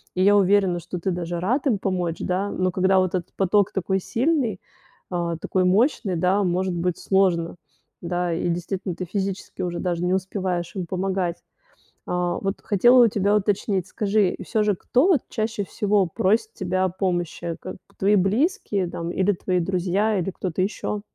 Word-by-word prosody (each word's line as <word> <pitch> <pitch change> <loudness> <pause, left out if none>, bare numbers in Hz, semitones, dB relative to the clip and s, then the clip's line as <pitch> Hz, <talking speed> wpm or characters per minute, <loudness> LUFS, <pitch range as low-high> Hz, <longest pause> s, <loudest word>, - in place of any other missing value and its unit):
И 185 - +2
я 205 +1 +6
уверена, 195 -2 +3
что 175 +1 -6
ты 190 +2 -1
даже 175 0 -3
рад 250 - 0
им 220 -6 +2
помочь, 180 -4 -1
да, 190 +3 -1
но 185 -1 0
когда 190 +1 +2
вот 185 -1 0
этот 180 -2 -3
поток 195 +1 +2
такой 190 0 -1
сильный, 240 - 0 0.5
э, 170 -2 -1
такой 185 +1 0
мощный, 195 - +2
да, 185 +4 +2
может 185 +1 0
быть 170 0 -1
сложно. 180 -4 +1 0.5
Да, 175 0 -1
и, 175 +1 -1
действительно, 180 +1 -3
ты 185 - -5
физически 195 +1 -4
уже 175 -1 -2
даже 175 -1 -2
не 180 - +1
успеваешь 185 -2 -2
им 185 -2 -3
помогать. 185 -1 -2 0.7
А 180 0 -1
вот 195 +1 -3
хотела 240 +5 +5
у - - +5
тебя 205 -1 +1
уточнить, 200 -2 0
скажи, 205 -1 +1
и - - -7
всё 215 - 0
же, 210 -1 +2
кто 255 - +2
вот 340 -10 +4
чаще 215 -1 -2
всего 205 -1 +1
просит 215 - +1
тебя 185 0 -1
о 185 - +1
помощи? 175 -2 -2
Как - - -7 0.2
твои 205 +2 +3
близкие 200 - +1
там 170 0 -4
или 190 +3 +2
твои 180 0 -1
друзья, 190 +4 0
или 180 +1 -1
кто-то 185 0 -3
ещё? 205 +1 -2
190 Hz, 180 wpm, -23 LUFS, 180-205 Hz, 0.7 s, я